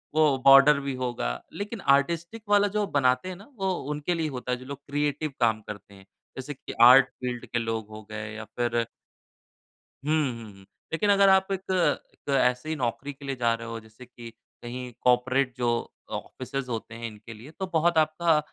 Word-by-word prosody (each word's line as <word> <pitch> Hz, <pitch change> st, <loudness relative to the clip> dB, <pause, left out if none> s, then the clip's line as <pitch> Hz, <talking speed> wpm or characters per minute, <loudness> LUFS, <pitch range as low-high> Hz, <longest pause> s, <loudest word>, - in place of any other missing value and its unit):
वो 150 Hz, -4 st, +4 dB
बॉर्डर 140 Hz, +1 st, +8 dB
भी 140 Hz, -1 st, -3 dB
होगा, 120 Hz, -, -3 dB
लेकिन 205 Hz, 0 st, -5 dB
आर्टिस्टिक 170 Hz, +10 st, +1 dB
वाला 205 Hz, 0 st, +5 dB
जो 210 Hz, -, +2 dB
बनाते 130 Hz, +4 st, +1 dB
हैं 185 Hz, -, -5 dB
ना 200 Hz, +4 st, -14 dB
वो 190 Hz, -1 st, +1 dB, 0.2 s
उनके 150 Hz, +4 st, -1 dB
लिए 165 Hz, -2 st, -1 dB
होता 125 Hz, -1 st, -5 dB
है 125 Hz, -, 0 dB
जो 130 Hz, -, -12 dB
लोग 140 Hz, 0 st, -7 dB
क्रिएटिव 145 Hz, 0 st, -1 dB
काम 110 Hz, -2 st, +2 dB
करते 105 Hz, -1 st, -10 dB
हैं 95 Hz, 0 st, -16 dB, 0.3 s
जैसे 140 Hz, +3 st, -5 dB
कि -, -, -9 dB
आर्ट 125 Hz, +2 st, +9 dB
फ़ील्ड 125 Hz, -1 st, -5 dB
के 120 Hz, -, -2 dB
लोग 115 Hz, -2 st, -3 dB
हो 110 Hz, 0 st, -9 dB
गए 105 Hz, 0 st, -5 dB
या 110 Hz, -, -6 dB
फिर 120 Hz, -1 st, +1 dB, 1.2 s
हुँ, 155 Hz, -, +1 dB, 0.2 s
हुँ, 115 Hz, -3 st, -9 dB
हुँ। 95 Hz, 0 st, -17 dB, 0.3 s
लेकिन 205 Hz, +5 st, +1 dB
अगर 200 Hz, -1 st, +6 dB
आप 190 Hz, 0 st, +4 dB
एक 190 Hz, -, -1 dB
एक 180 Hz, -5 st, -1 dB
ऐसी 125 Hz, +5 st, +1 dB
नौकरी 135 Hz, +1 st, -3 dB
के 140 Hz, +1 st, -13 dB
लिए 135 Hz, -1 st, -2 dB
जा 120 Hz, -2 st, +2 dB
रहे 115 Hz, 0 st, -6 dB
हो 115 Hz, 0 st, -5 dB
जैसे 110 Hz, +3 st, -15 dB
कि 120 Hz, -1 st, -11 dB, 0.3 s
कहीं 125 Hz, +1 st, -6 dB
कॉर्पोरेट 125 Hz, +1 st, +2 dB
जो 120 Hz, -1 st, 0 dB, 0.4 s
ऑफिसेज़ 130 Hz, 0 st, -5 dB
होते 115 Hz, 0 st, -5 dB
हैं 115 Hz, 0 st, -5 dB
इनके 110 Hz, +1 st, -11 dB
लिए 120 Hz, +8 st, -12 dB
तो 190 Hz, -, -2 dB
बहुत 165 Hz, +1 st, +3 dB
आपका 155 Hz, +1 st, +3 dB
130 Hz, 195 wpm, -27 LUFS, 115-155 Hz, 1.2 s, आर्ट